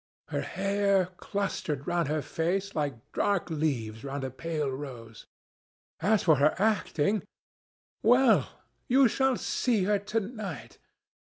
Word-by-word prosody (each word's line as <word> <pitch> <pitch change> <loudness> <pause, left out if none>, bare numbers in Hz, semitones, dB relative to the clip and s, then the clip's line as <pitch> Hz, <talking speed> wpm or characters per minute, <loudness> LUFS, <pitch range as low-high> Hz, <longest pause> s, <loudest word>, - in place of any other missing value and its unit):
Her - - -1
hair 195 -1 +1
clustered 160 -8 -3
round 175 -3 0
her 150 0 -1
face 190 +4 -1
like 140 -7 -3
dark 195 -4 0
leaves 125 -8 -2
round 140 0 -4
a 130 - -3
pale 150 0 -2
rose. 125 -5 -8 0.7
As 205 +4 +2
for 155 -4 +5
her 145 +3 +3
acting—well, 220 - +1 0.4
you 265 +1 +5
shall 265 +3 +2
see 230 -6 0
her 205 +1 +2
to 215 +3 -1
night. 205 - -7
180 Hz, 120 wpm, -29 LUFS, 145-205 Hz, 0.7 s, for